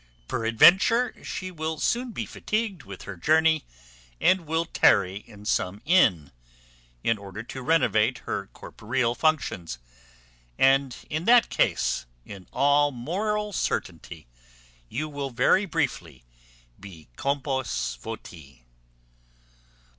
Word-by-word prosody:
Peradventure 185 - +4
she 185 0 -5
will 160 -1 -4
soon 245 +6 -1
be - - -4
fatigated 215 - -3
with 100 -1 -9
her 100 - -7
journey, 160 - +2 0.5
and 185 -3 +2
will 160 +2 0
tarry 95 - +3
in 105 -2 -14
some 100 -2 -1
inn, 100 - +3 0.7
in 115 -2 +1
order 100 +2 -8
to 130 +2 -8
renovate 125 -6 +2
her - - -3
corporeal 120 +1 -3
functions; 125 - -1 0.8
and 135 -1 +3 0.2
in 155 +3 -2
that 240 0 +5
case, - - 0 0.2
in 95 -3 -11
all 145 +1 +3
moral 205 - -2
certainty, 85 - -3 0.6
you 150 +6 -3
will 145 -2 -5
very 135 - +2
briefly 85 - -3 0.6
be 90 -6 -12
compos 130 - -2
voti." 70 -7 -10
135 Hz, 110 wpm, -26 LUFS, 100-160 Hz, 0.8 s, that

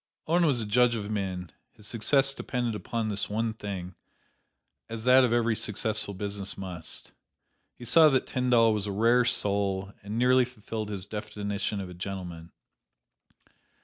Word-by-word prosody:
Owen 170 +1 +3
was 135 -5 +2
a 110 - -2
judge 120 +3 +3
of 105 -1 -4
men; 95 -4 -3 0.2
his 105 - -13
success 135 +5 +2
depended 120 -4 -2
upon 110 +1 -3
this 100 -1 -2
one 110 +2 -1
thing, 95 -4 -6 1.0
as 115 -1 -5
that 130 +1 +6
of 125 - +2
every 115 -1 +2
successful 105 -1 -1
business 100 0 -4
must. 90 -4 -6 0.6
He 120 - -11
saw 155 +6 +7
that 135 -2 +1
Tyndall 120 -3 +3
was 105 -1 -2
a - - -2
rare 115 +4 +3
soul 100 -3 +1
and 105 +1 -5
nearly 125 +1 +5
fulfilled 110 -3 -6
his 100 -2 -5
definition 105 -1 -4
of 95 - -5
a 90 - -9
gentleman. 90 -2 -7
105 Hz, 155 wpm, -28 LUFS, 100-120 Hz, 1.0 s, saw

